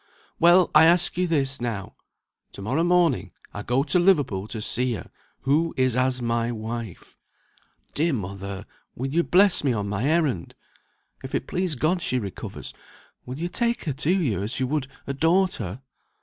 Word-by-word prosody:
"Well! 175 +2 +5
I - - +8
ask 175 +1 +4
you 180 +1 0
this 140 -5 +1
now. 115 -5 -4 0.6
To - - -9
morrow 135 +10 0
morning 175 -1 +2 0.2
I 100 - -5
go 125 +5 +1
to 155 +5 +2
Liverpool 145 - +2
to 110 - -6
see 125 +3 -1
her, 90 - -9 0.3
who 155 +5 +1
is 130 -2 +2
as 130 0 +1
my 115 0 0
wife. 115 -3 -7 0.7
Dear 160 +2 +1
mother! 100 -2 -5 0.3
will 135 +3 -4
you 170 - +3
bless 190 +1 +4
me 135 -3 +2
on 105 -2 -2
my 105 +4 -2
errand? 145 - 0 0.7
If - - -5
it - - -2
please 180 -3 -2
God 170 +7 0
she 130 - +1
recovers, 100 -6 -6 0.5
will 125 +2 -6
you 170 +3 -2
take 235 +6 0
her 150 - -2
to 145 +4 -1
you 145 - +1
as 110 +7 -2
you 130 - +1
would 140 0 -2 0.2
a 140 - -3
daughter?" 160 - +1
135 Hz, 175 wpm, -24 LUFS, 115-170 Hz, 0.7 s, I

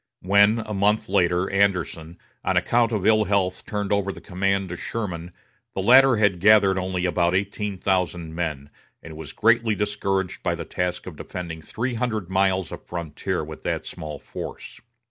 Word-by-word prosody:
When, 100 +4 +5
a 105 - -5
month 105 +2 +1
later, 90 -1 +2
Anderson, 90 -4 0 0.3
on - - +1
account 120 -1 +2
of 105 -4 -1
ill 110 0 +4
health 95 -2 0
turned 105 -2 -3
over 100 -1 +1
the - - -10
command 95 0 -1
to 90 - -4
Sherman, 90 -4 -5 0.4
the 95 - -1
latter 130 +3 +7
had 105 -4 +2
gathered 100 -1 +5
only 95 -1 -2
about 90 0 +1
eighteen 100 +1 -2
thousand 90 -4 -1
men, 75 -4 -4 0.3
and 80 -1 -9
was 75 -2 -8
greatly 115 -1 +3
discouraged 95 -2 -2
by - - 0
the - - -6
task 90 0 -3
of 85 -5 -9
defending 85 -2 -6
three 120 +9 -3
hundred 110 -6 -2
miles 95 -1 +1
of - - -8
frontier 85 -4 -4
with - - -9
that - - -2
small 75 -1 -7
force. - - -8
95 Hz, 170 wpm, -24 LUFS, 90-105 Hz, 0.4 s, latter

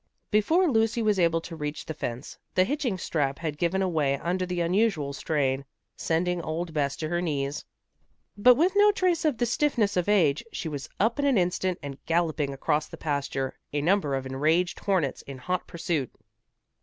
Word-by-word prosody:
Before 320 - +3
Lucy 225 -3 +2
was 210 -3 +2
able 165 -1 +3
to 165 - -8
reach 150 -1 -5
the 160 - -4
fence, 125 -3 -5 0.2
the 185 - +5
hitching 260 -3 -1
strap 140 -6 -1
had 155 -3 -4
given 185 +3 +1
away 150 -7 +1
under 180 +4 -2
the 180 -1 -2
unusual 170 -5 +1
strain, 140 -2 0 0.3
sending 175 +2 0
old 165 +1 -4
Bess 140 -2 0
to 155 - -4
her 175 +1 0
knees. 145 -4 -2 0.7
But 245 +4 +6
with 335 +8 +3
no 415 +1 +6
trace 365 -5 +1
of 295 -6 +2
the 240 - +1
stiffness 235 -4 +1
of 180 +2 0
age, 165 -7 +3
she - - -4
was 145 -3 -5
up 230 +6 +1
in 285 - +1
an 275 -5 +3
instant 180 0 0
and 140 -1 -7
galloping 160 -4 +1
across 150 +2 0
the 165 - -10
pasture, 140 -3 -2
a 145 - +1
number 165 -4 +2
of 135 0 -3
enraged 155 +7 +1
hornets 180 -9 0
in 140 -1 -9
hot 180 +8 -3
pursuit. 165 -6 -2
170 Hz, 185 wpm, -27 LUFS, 145-205 Hz, 0.7 s, But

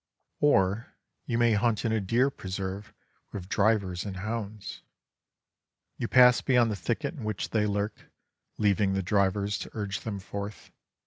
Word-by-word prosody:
Or 100 -5 +2 0.3
you 115 - 0
may 120 -1 +4
hunt 110 +1 +1
in 115 - +1
a 110 -1 +1
deer 120 +8 +2
preserve 95 -1 -5 0.4
with 95 -3 -6
drivers 100 -4 +1
and 100 -2 -6
hounds. 105 0 -5 1.1
You 120 - -3
pass 125 -1 +6
beyond 120 -4 +3
the - - -1
thicket 120 - -2
in 140 -8 -8
which 105 -2 -3
they 105 -2 +2
lurk, 100 +1 -3 0.5
leaving 100 -1 +2
the 95 0 0
drivers 100 +1 +1
to - - -6
urge 100 -3 -3
them 105 -3 -4
forth. 100 +2 -7
105 Hz, 150 wpm, -28 LUFS, 100-115 Hz, 1.1 s, pass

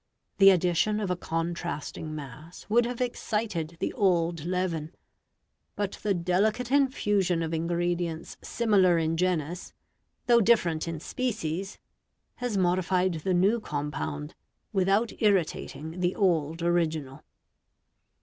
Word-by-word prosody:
The 195 0 +9
addition 185 +3 +2
of 200 -4 -2
a - - +1
contrasting 165 -2 -4
mass 150 +4 -10
would 235 +2 +4
have 245 0 -5
excited 210 -9 -2
the - - -2
old 170 - +1
leaven, 175 -3 -2 0.8
but 205 -1 -3
the 200 -2 +1
delicate 210 +8 0
infusion 205 -11 +2
of 165 0 -3
ingredients 170 0 -2
similar 195 -7 +3
in 165 0 0
genus, 175 -1 -1 0.5
though 235 -1 +5
different 175 -8 +2
in 165 -2 -4
species, 195 - -3 0.6
has 245 -4 -2
modified 185 0 +2
the 185 -1 +1
new 200 +6 +3
compound 150 -3 -4 0.4
without 195 +4 +2
irritating 175 -5 0
the 180 0 0
old 165 -4 +1
original. 160 -6 -1
180 Hz, 115 wpm, -28 LUFS, 165-205 Hz, 0.8 s, The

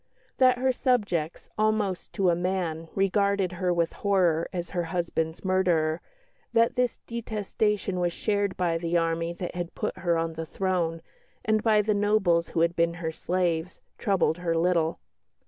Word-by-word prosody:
That 255 -1 +5
her 260 +1 +2
subjects, 205 - 0
almost 215 -4 0
to 185 -3 +2
a - - +2
man, 175 -2 -2
regarded 195 -1 +2
her 180 0 -1
with 170 -1 +1
horror 180 -5 +1
as 175 -2 -4
her 175 -2 -1
husband's 165 -1 -2
murderer, 175 -4 +2 0.5
that 230 0 +3
this 250 -1 +1
detestation 210 -4 -2
was 175 -1 +1
shared 200 +1 -1
by 170 -2 +1
the 170 +1 0
army 165 0 0
that 175 0 -5
had 175 -1 -5
put - - -3
her 170 -2 +1
on 165 0 -1
the 160 0 -5
throne, 175 -4 -1 0.4
and 215 0 +2
by 215 -1 +4
the 215 +1 +1
nobles 200 -5 +2
who 165 - -1
had 170 +1 +2
been 170 0 +1
her 165 -2 -3
slaves, 175 0 -1 0.2
troubled 190 -4 +1
her 170 -1 0
little. 165 -1 +2
180 Hz, 165 wpm, -27 LUFS, 170-200 Hz, 0.5 s, That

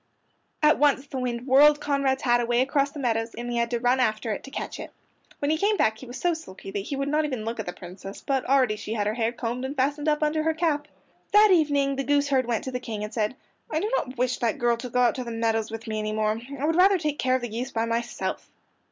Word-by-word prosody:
At 305 +1 +5
once 285 -2 +3
the 270 -2 -5
wind 245 -1 -3
whirled 290 +3 +6
Conrad's 275 -2 0
hat 240 -1 +3
away 240 +1 +2
across 275 +1 +1
the 300 - -11
meadows, 225 -3 -1
and 240 +1 -5
he 240 - -1
had 235 0 +1
to 240 -1 -1
run 245 +2 +2
after 220 -2 0
it 210 - -4
to - - -9
catch - - -5
it. - - -7 0.5
When 285 +1 0
he 315 - +1
came 415 +2 +2
back 220 0 +2
he 260 - -10
was 245 +2 -7
so 350 -1 +2
sulky 195 -12 -9
that 200 - -2
he 210 +8 -4
would 275 0 -2
not 300 +2 +2
even 255 -7 -3
look 230 0 -4
at 220 - -4
the - - -2
Princess, 185 +2 -10
but 270 -2 0
already 255 -5 +3
she 215 +1 -5
had 210 -2 -1
her 210 - 0
hair 230 0 0
combed 245 +1 -4
and 265 +2 -4
fastened 290 +3 0
up 300 0 +1
under 305 +1 +1
her 320 0 0
cap. 305 -3 0 0.5
That 420 0 +7
evening 285 -5 +3
the 275 - -1
goose 285 +1 +2
herd 260 -3 +2
went 235 -3 -1
to 260 - -4
the 250 - -3
King 220 -4 -5
and 210 +1 -6
said, 215 +2 -1 0.3
"I 310 - 0
do 420 +6 -2
not 255 - -3
wish 250 0 0
that 230 -2 0
girl 240 0 +2
to 250 +1 -6
go 250 +1 +1
out 245 - +4
to 255 - -4
the 240 - -7
meadows 225 -1 0
with 225 0 -7
me 215 -1 -3
any 215 0 -2
more. 215 +1 0 0.2
I 285 - -1
would 325 +1 +1
rather 380 +2 +5
take 300 -3 -2
care 255 0 +2
of 260 - -2
the 240 - -3
geese 240 +4 -4
by 225 -2 -1
myself." 230 +1 -3
255 Hz, 280 wpm, -26 LUFS, 230-290 Hz, 0.5 s, That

